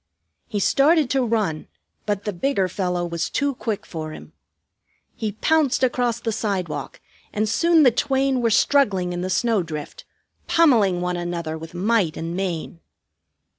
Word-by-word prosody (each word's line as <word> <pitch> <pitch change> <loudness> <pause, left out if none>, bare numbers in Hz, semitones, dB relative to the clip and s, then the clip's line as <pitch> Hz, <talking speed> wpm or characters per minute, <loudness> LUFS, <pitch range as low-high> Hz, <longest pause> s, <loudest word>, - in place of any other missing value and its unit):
He 210 -3 -2
started 285 - +3
to 270 -1 +2
run, 215 -9 -1 0.4
but 205 -1 -1
the 210 - -3
bigger 195 0 0
fellow 180 -1 -2
was 170 -1 -3
too 285 -1 0
quick 225 -4 -4
for 155 -2 -6
him. - - -12 0.8
He 215 -2 -3
pounced 285 +3 +1
across 245 -2 +1
the 230 -1 -2
sidewalk, 185 -9 -3 0.3
and 215 +1 -1
soon 330 +8 +4
the 255 - +6
twain 265 +1 +1
were 230 - +2
struggling 205 -7 +2
in 175 - -3
the 185 - -3
snowdrift, 180 -9 -2 0.4
pummeling 220 - +4
one 180 0 -1
another 170 -2 -3
with 165 +2 -9
might 195 -3 +1
and 165 +1 -4
main. 175 -3 -3
205 Hz, 150 wpm, -22 LUFS, 175-250 Hz, 0.8 s, the